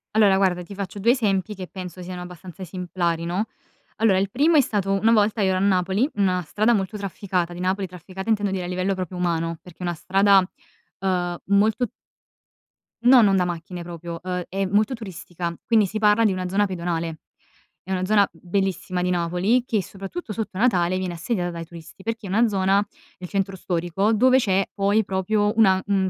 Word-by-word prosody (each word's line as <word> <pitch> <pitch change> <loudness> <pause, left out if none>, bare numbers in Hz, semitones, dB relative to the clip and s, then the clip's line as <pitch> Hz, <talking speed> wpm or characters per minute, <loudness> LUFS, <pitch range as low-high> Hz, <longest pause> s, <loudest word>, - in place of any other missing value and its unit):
Allora 205 -3 +5
guarda, 185 -2 +1
ti 190 - -10
faccio 200 0 -5
2 230 +4 +4
esempi 210 -4 0
che 185 -1 -7
penso 180 -1 -8
siano 180 0 -6
abbastanza 180 +1 -10
esemplari, 175 -2 -2
no? 185 +6 -1 0.5
Allora 215 -4 +3
il 195 +1 0
primo 305 +8 +3
è 295 - +7
stato 195 -5 0
una 225 - +5
volta 215 0 +3
io 195 - +3
ero 185 - +1
a - - 0
Napoli, 195 +5 +2
una 185 -3 +1
strada 215 +8 +1
molto 200 -1 -1
trafficata 190 -3 -2
di 175 - -9
Napoli, 190 +2 0
trafficata 185 +3 -8
intendo 205 -2 +2
dire 185 -2 -2
a - - -4
livello 185 +2 -1
proprio 185 -1 -5
umano, 165 -2 -1
perché 180 -2 -15
è - - -13
una 175 -1 -1
strada, 195 +4 +4 0.6
uhm, 180 -2 0
molto 210 +5 +3 1.2
No, 250 0 +8
non 200 -3 +4
da 180 -1 +2
macchine 175 0 -5
proprio, 170 0 -7
ehm, 180 -1 -3
è 195 +1 -1
molto 205 +6 +2
turistica, 180 -6 -6
quindi 220 -3 +4
si 215 +3 -4
parla 210 +1 +4
di 210 - +4
una 185 -1 -2
zona 205 +2 +2
pedonale. 170 -3 -3 0.6
È 190 - -8
una 185 -1 0
zona 205 0 +4
b - - -21
bellissima 190 -1 -1
di 180 - +1
Napoli, 180 +7 +1
che 215 -5 0
soprattutto 205 - -7
sotto 215 -3 -4
Natale 185 -6 +2
viene 185 -1 -3
assediata 175 +1 -2
dai 170 -1 -6
turisti, 170 +2 -13
perché 225 0 -4
è - - -7
una 225 +5 +3
zona 195 -1 +2 0.4
nel 180 -1 -7
centro 195 -1 -1
storico 175 +3 -1
dove 255 +4 +5
c'è 195 -5 +2
poi 200 +2 +2
proprio 205 +3 0
una, 195 -4 +6
mhmm, 195 -2 +1
190 Hz, 200 wpm, -23 LUFS, 180-205 Hz, 1.2 s, No